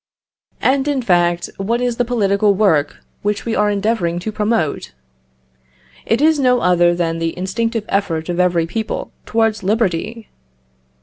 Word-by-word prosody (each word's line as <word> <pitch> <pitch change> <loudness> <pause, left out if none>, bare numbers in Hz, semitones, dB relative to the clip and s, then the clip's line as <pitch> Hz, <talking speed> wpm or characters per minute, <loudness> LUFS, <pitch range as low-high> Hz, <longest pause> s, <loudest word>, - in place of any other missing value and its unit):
And, 270 +2 +2
in 280 -3 0
fact, 175 -3 +2
what 225 +5 -1
is 245 -1 -1
the 245 - +1
political 205 -4 +2
work 160 -8 +1 0.2
which 205 0 -2
we 230 - -1
are 210 0 +2
endeavouring 200 -4 0
to 220 - -4
promote? 205 - -1 1.1
It 225 +4 +1
is 315 -1 +4
no 250 -2 +3
other 175 -1 +3
than 165 -1 -1
the 165 +1 -2
instinctive 225 +4 -2
effort 165 -5 -1
of 175 0 -3
every 175 -2 +2
people 220 +6 -4 0.2
towards 225 -1 +1
liberty. 215 +2 -1
205 Hz, 145 wpm, -18 LUFS, 175-230 Hz, 1.1 s, is